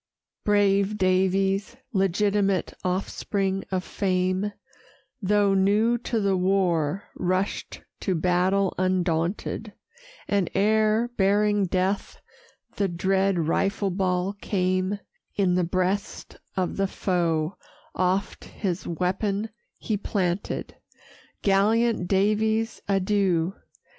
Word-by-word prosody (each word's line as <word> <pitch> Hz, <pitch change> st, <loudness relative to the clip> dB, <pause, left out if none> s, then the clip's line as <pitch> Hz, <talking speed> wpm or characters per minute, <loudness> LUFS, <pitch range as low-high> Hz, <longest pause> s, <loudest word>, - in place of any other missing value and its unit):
Brave 205 Hz, 0 st, +2 dB
Daviess, 190 Hz, +2 st, +1 dB, 0.2 s
legitimate 195 Hz, 0 st, +1 dB
offspring 195 Hz, +1 st, -1 dB
of 185 Hz, -1 st, -1 dB
fame, 185 Hz, +1 st, 0 dB, 0.7 s
Though 200 Hz, 0 st, +3 dB
new 210 Hz, +5 st, +3 dB
to 235 Hz, -1 st, -1 dB
the 200 Hz, -2 st, +2 dB
war, 185 Hz, -3 st, +1 dB
rush'd 185 Hz, +2 st, -2 dB, 0.2 s
to 190 Hz, -, -1 dB
battle 180 Hz, +3 st, +2 dB
undaunted; 185 Hz, +3 st, -1 dB, 0.5 s
And 200 Hz, -3 st, +1 dB
ere, 215 Hz, +3 st, +2 dB
bearing 205 Hz, 0 st, +3 dB
death, 190 Hz, +3 st, -1 dB, 0.6 s
the 200 Hz, -, +2 dB
dread 190 Hz, +2 st, +1 dB
rifle 195 Hz, +3 st, 0 dB
ball 185 Hz, 0 st, 0 dB
came, 185 Hz, 0 st, 0 dB, 0.4 s
In 190 Hz, -3 st, +2 dB
the 180 Hz, 0 st, +2 dB
breast 185 Hz, +3 st, -2 dB, 0.2 s
of 185 Hz, -2 st, -1 dB
the 195 Hz, 0 st, +1 dB
foe 170 Hz, -3 st, -1 dB, 0.4 s
oft 185 Hz, +2 st, -1 dB
his 185 Hz, -4 st, -4 dB
weapon 195 Hz, +5 st, -1 dB, 0.3 s
he 215 Hz, -, -2 dB
planted. 190 Hz, -2 st, -2 dB, 0.7 s
Gallant 215 Hz, +1 st, +2 dB
Daviess, 220 Hz, +3 st, +1 dB
adieu! 195 Hz, -3 st, +1 dB
195 Hz, 95 wpm, -25 LUFS, 185-205 Hz, 0.7 s, Though